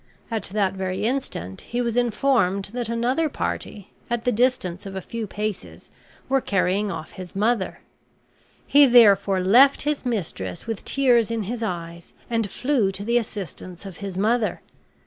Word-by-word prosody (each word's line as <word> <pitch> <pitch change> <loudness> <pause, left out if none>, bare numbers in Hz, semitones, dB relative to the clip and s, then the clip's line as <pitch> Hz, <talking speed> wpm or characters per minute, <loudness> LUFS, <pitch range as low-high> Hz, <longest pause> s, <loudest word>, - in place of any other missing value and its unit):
At 220 -3 -2
that 195 -1 0
very 190 0 -3
instant 215 - -3
he 240 - -4
was 235 -2 -1
informed 235 -5 +2
that 240 -2 -3
another 250 +7 +1
party, 205 -7 -5 0.2
at 240 -1 -1
the 250 - +3
distance 210 -6 0
of 195 - -7
a - - -2
few 225 +3 -5
paces, 210 -1 -5 0.4
were 270 0 +2
carrying 200 0 +1
off 160 -5 -6
his 185 -1 -10
mother; 210 0 0 0.8
he 285 0 +6
therefore 200 -6 +5
left 250 +9 +5
his 295 0 -1
mistress 170 - -3
with 225 -3 -4
tears 245 -5 +3
in 230 -2 -2
his 230 +4 -4
eyes 170 -5 -5 0.2
and 225 -3 0
flew 250 -4 +1
to 195 +1 -6
the 235 +3 +2
assistance 190 -4 -7
of 190 -2 -8
his 195 -3 -6
mother. 220 +3 +1
215 Hz, 160 wpm, -23 LUFS, 190-240 Hz, 0.8 s, he